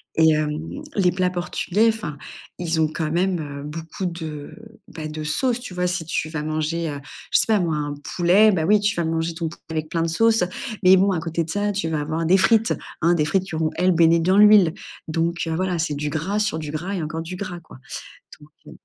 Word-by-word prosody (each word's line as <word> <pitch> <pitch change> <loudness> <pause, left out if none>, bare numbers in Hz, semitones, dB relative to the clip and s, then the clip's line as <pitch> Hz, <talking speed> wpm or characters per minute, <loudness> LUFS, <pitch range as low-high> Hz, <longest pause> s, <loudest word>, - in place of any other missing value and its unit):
Et 160 0 +5
hem, 155 - -2
les 185 -3 +3
plats 180 0 0
portugais 180 +4 0
enfin, 215 -10 -4 0.4
ils 165 -2 -1
ont 160 - +3
quand 155 0 -3
même, 180 +1 +1
heu, 140 -2 -6
beaucoup 165 +5 -6
de, 160 -4 -5 0.4
bah 160 -7 -7
de 155 0 -6
sauce, 240 - 0
tu 245 -7 -8
vois? 180 0 0
Si 175 -2 -2
tu 155 0 -2
vas 155 -2 -4
manger, 155 +2 -2
heu, 145 -1 -5 0.3
je - - +5
sais - - +3
pas 215 -2 +3
moi 165 -3 0
un 145 -1 -3 0.2
poulet, 190 +5 +5
bah, 165 -5 0
oui 210 +4 +5
tu 205 0 0
vas 170 - -1
manger 165 +1 -1
ton 165 -1 -3
poulet - - -13
avec 155 -1 -3
plein 165 -1 0
de - - 0
sauce. 225 +5 +3 0.4
Mais 185 +1 +7
bon 195 +2 +3
à 180 - 0
côté 165 +1 -2
de 160 - -10
ça, 205 +3 0
tu 195 -5 -2
vas 155 -2 -1
avoir 160 +3 -2
des 190 - +5
frites, 225 +4 +3 0.3
hein, 170 +2 +4
des 155 -3 +1
frites 190 +4 0
qui 175 - -6
vont, 160 0 0
elles, 185 +1 +3
baigner 165 0 +5
dans 185 +4 +2
l'huile. 205 -5 +7 0.3
Donc 165 +1 -1
heu, 160 - -1
voilà 180 0 -1
c'est 155 -3 -1
du 150 +1 -2
gras, 165 +7 -2
sur 210 -7 0
du 150 -2 -5
gras 170 +6 -4
et 180 - -2
encore 160 +1 -4
du 175 +3 -6
gras, 180 -2 -6
quoi. 165 - -15 0.6
Donc 150 0 -17 0.2
heu - - -11
165 Hz, 240 wpm, -22 LUFS, 155-185 Hz, 0.6 s, Mais